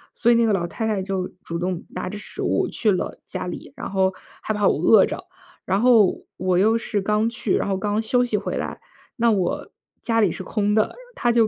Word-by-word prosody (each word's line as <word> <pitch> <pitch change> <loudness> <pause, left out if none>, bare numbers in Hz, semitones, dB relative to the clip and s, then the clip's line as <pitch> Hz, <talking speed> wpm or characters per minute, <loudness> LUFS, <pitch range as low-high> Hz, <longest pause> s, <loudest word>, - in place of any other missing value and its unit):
所 235 - +3
以 - - +5
那 235 - +4
个 220 - +2
老 180 -3 0
太 225 +5 -3
太 215 -2 0
就 190 -1 -2 0.2
主 170 0 -4
动 180 0 -3
拿 - - -4
着 210 - -6
食 205 - -7
物 - - +1
去 215 - +1
了 185 - -2
家 - - -4
里， 175 - -7
然 - - -6
后 190 -1 +2 0.3
害 - - -3
怕 210 -1 +2
我 - - +2
饿 - - +6
着。 - - -5 0.4
然 190 +1 +1
后， 230 -4 +4
我 185 -1 +1
又 215 +5 +4
是 220 -2 -2
刚 210 +3 +1
去， 230 -3 -2
然 - - 0
后 195 - 0
刚 205 +2 0
休 245 +3 +2
息 235 - -1
回 200 - -3
来， - - -4 0.4
那 235 -1 +3
我 190 -4 -1 0.3
家 230 -1 +1
里 200 -5 +3
是 - - -6
空 210 +2 0
的。 215 0 +1 0.2
她 240 - +2
就 230 -2 +4
210 Hz, 250 characters per minute, -23 LUFS, 190-225 Hz, 0.4 s, 饿